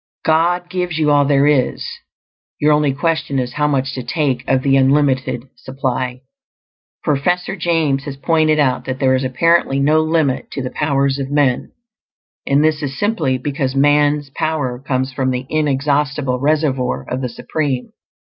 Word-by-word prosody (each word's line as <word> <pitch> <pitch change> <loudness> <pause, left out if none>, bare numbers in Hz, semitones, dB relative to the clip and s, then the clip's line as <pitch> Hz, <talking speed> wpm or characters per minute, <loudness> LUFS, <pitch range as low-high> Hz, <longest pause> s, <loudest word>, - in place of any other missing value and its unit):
God 175 +3 +2
gives 180 -3 -3
you 150 -2 +2
all 145 -1 +4
there 140 0 +3
is; 145 -4 +1 0.7
your 150 0 +4
only 150 -1 +2
question 145 0 -1
is 125 -1 -2
how 150 0 +1
much 135 -2 -1
to 130 - -4
take 130 0 -1
of 130 -1 +1
the 135 -1 +3
unlimited 135 -2 +2
supply. 130 -1 -3 0.8
Professor 180 +6 0
James 160 -6 0
has 140 -2 -6
pointed 155 +1 +2
out 135 -4 +1
that 130 -1 -3
there 130 -1 +2
is 130 0 +1
apparently 135 +2 +2
no 155 +3 +3
limit 155 -4 0
to 135 - -4
the 125 - -4
powers 140 -2 0
of 135 -1 -3
men; 140 -3 +1 0.7
and 140 +2 +3
this 155 -1 +1
is 140 -2 -4
simply 205 -11 0
because 135 0 -3
man's 145 0 +2
power 145 -5 -2
comes 130 0 -2
from 130 0 -1
the 130 0 -2
inexhaustible 145 -2 0
reservoir 135 - 0
of 130 +1 -3
the 125 - -2
Supreme. 135 +1 -3
140 Hz, 160 wpm, -18 LUFS, 130-155 Hz, 0.8 s, all